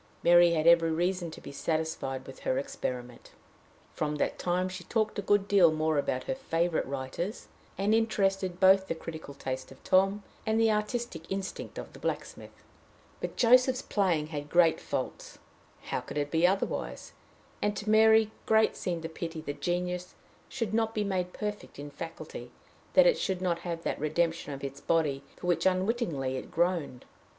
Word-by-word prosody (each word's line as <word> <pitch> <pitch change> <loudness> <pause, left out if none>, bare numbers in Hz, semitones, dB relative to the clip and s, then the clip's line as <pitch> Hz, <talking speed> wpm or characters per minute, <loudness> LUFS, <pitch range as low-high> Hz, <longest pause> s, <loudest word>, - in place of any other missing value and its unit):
Mary 175 0 +6
had 155 -1 0
every 170 -1 +6
reason 175 +2 0
to - - -10
be - - -9
satisfied 150 -4 -2
with 135 - -11
her 260 - -1
experiment. 125 - -5 0.6
From 150 -1 -2
that 150 - -1
time 180 +1 0
she 185 -1 -7
talked 215 0 0
a - - 0
good 205 0 +2
deal 190 -5 +6
more 155 -1 +1
about 130 -2 -1
her - - -2
favorite 170 -10 -1
writers, 140 - -4 0.3
and 200 +2 +2
interested 195 -5 +1
both 190 0 +6
the 165 - -2
critical 160 -3 -8
taste 130 -1 -5
of - - -15
Tom 195 +2 +3 0.2
and 220 +1 +1
the 225 -1 +4
artistic 210 -5 -3
instinct 195 0 -4
of - - -7
the - - -12
blacksmith. - - -5 0.6
But - - -4
Joseph's 255 +2 +4
playing 180 -7 +1
had 145 0 -4
great 170 -1 +4
faults: - - -4 0.5
how - - -2
could - - -7
it 145 0 -1
be 165 +2 +4
otherwise? 195 +1 -2 0.5
and 205 0 0
to 205 - -6
Mary 220 0 +5 0.2
great 220 0 +4
seemed 170 -2 -3
the - - -2
pity 165 0 -6
that 145 -2 -6
genius 180 +2 -2 0.3
should 230 -5 -3
not 225 0 +1
be 210 - +1
made 185 -3 -1
perfect 210 +1 -5
in 145 +1 -7
faculty, 165 +3 -8 0.5
that - - +8
it - - +4
should 190 -2 -1
not 175 -2 0
have 170 -1 -5
that - - -2
redemption 165 +1 0
of 140 0 -7
its 140 0 -6
body 150 -5 +1 0.2
for - - -9
which 180 +1 +2
unwittingly 185 - 0
it - - -7
groaned. 165 -7 -1
175 Hz, 175 wpm, -29 LUFS, 155-205 Hz, 0.6 s, that